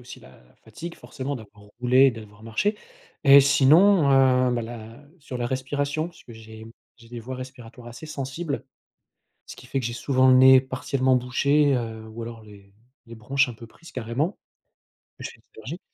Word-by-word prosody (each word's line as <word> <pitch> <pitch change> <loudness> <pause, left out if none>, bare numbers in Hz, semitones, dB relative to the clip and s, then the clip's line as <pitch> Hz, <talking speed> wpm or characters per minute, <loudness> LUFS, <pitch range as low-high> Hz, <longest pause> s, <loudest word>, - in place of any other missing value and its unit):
aussi - - -12
la 65 - -18 0.2
fatigue 165 +10 -9
forcément 140 +1 -6
d'avoir 105 -2 -15
roulé 125 +2 +5
et - - +4
d'avoir 105 -2 -12
marché 190 - -1 0.5
et 140 0 +9
sinon, 150 +4 +4
heu, 130 -1 +4
bah 120 - -2
la 115 +3 -10
sur 135 -3 -8
la 120 -1 -2
respiration. 145 +4 -2
Parce 170 - -18
que 120 - -13
j'ai 110 0 -12 0.3
j'ai 115 -1 -18
des 120 -1 -7
voies 130 +3 -7
respiratoires 125 -2 -11
assez 120 +7 -11
sensibles. 140 +2 -5 0.8
Ce - - -10
qui - - -15
fait 135 - -2
que 125 - -3
j'ai 120 - -4
souvent 130 +2 +1
le 130 - +7
nez 130 0 +7
partiellement 130 0 -1
bouché, 140 +4 +2
heu, 110 -2 -6
ou 110 +1 -8
alors 115 -1 -9
les 100 -2 -17 0.3
les 115 - -11
bronches 130 +4 0
un 120 - -7
peu 115 +1 -13
prises 165 - -17
carrément. 130 - -3 0.8
Je - - -6
fais - - -17
des - - -30 0.2
allergies. 150 - -8
130 Hz, 190 wpm, -24 LUFS, 115-140 Hz, 0.8 s, et